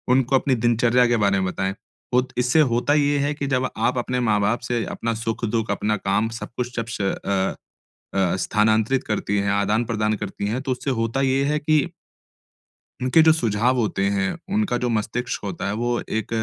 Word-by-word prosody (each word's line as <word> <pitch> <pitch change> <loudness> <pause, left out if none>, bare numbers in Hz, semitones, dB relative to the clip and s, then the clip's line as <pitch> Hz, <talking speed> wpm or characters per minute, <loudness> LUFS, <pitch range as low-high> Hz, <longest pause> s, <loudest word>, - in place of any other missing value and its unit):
उनको 135 0 +2
अपनी 130 0 +1
दिनचर्या 120 +1 +4
के - - +3
बारे 100 -1 +3
में 95 - 0
बताएँ, 95 +1 -2 0.4
होत 125 +1 +2
इससे 125 +5 +3
होता 125 +5 +2
ये 145 -1 +2
है 145 +1 0
कि 145 -1 -4
जब 130 +1 +1 0.2
आप 125 - -1
अपने 125 +1 -1
माँ-बाप 105 +2 +2
से 120 -2 0
अपना 115 0 -2
सुख, 115 +1 -2
दुःख, 110 -1 -1
अपना 105 +1 0
काम, 105 +3 0
सब 115 0 -7
कुछ 125 0 -3
जब 115 -1 -2
श - - -1
अ 95 0 -1 0.6
अ, 95 -1 +2
स्थानांतरित 110 +5 +2
करती 105 -1 -1
है, 100 0 0
आदान-प्रदान 105 +2 +1
करती 100 0 -5
हैं, 115 +5 -1
तो 135 - -1
उससे 130 +2 -3
होता 115 +4 -1
ये 135 0 +2
है 150 +2 +1
कि 155 +1 +1 1.3
उनके 130 +6 +4
जो 160 0 +6
सुझाव 120 -3 +1
होते 105 -4 0
हैं, 100 -1 0 0.2
उनका 205 - +1
जो 125 0 -1
मस्तिष्क 115 +2 -2
होता 100 -1 -4
है, 100 - -1
वो 120 +2 -1
एक 110 0 -2
115 Hz, 195 wpm, -23 LUFS, 105-125 Hz, 1.3 s, जो